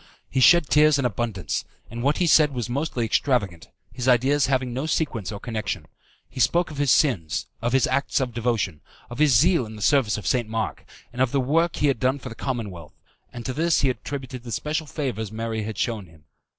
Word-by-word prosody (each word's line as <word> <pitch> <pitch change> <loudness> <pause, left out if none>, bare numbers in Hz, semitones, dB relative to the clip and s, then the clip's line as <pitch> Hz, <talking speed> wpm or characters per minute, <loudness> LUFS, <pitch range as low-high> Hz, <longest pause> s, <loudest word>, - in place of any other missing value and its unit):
He 130 - 0
shed 170 +4 +6
tears 150 0 +5
in 135 - -1
abundance, 105 - -2 0.3
and 115 0 -5
what 140 +4 +1
he 180 - +2
said 150 -4 +4
was 120 -2 -2
mostly 130 -1 -2
extravagant, 105 - 0 0.2
his 125 0 -4
ideas 130 +3 +3
having 130 -2 0
no 135 +5 -3
sequence 115 - -1
or 100 - -6
connection. 105 -7 -4 0.4
He - - -10
spoke 170 +8 +2
of 145 - -7
his 145 -1 +1
sins, 105 - +2 0.2
of 120 +1 0
his 135 - +4
acts 140 +3 0
of 125 -3 -2
devotion, 115 -9 -1 0.3
of 120 - -7
his 145 -7 +5
zeal 170 - +4
in 110 - -10
the 105 - -10
service 130 -5 +3
of 105 - -8
St. 120 0 0
Mark, 110 0 -3 0.3
and 125 - -3
of 130 -2 +2
the 140 - +1
work 165 +6 +1
he 145 - +1
had 135 -5 +1
done 130 +3 +1
for 130 -1 -8
the - - -8
Commonwealth, 105 - -5 0.4
and 120 -1 -8
to 130 - -2
this 165 +1 +1
attributed 130 -1 -3
the 120 -1 -9
special 155 +5 -2
favours 120 -9 -4
Mary 110 0 -3
had 110 -1 -5
shewn 110 -5 -2
him. 80 -2 -20
125 Hz, 215 wpm, -24 LUFS, 110-140 Hz, 0.4 s, shed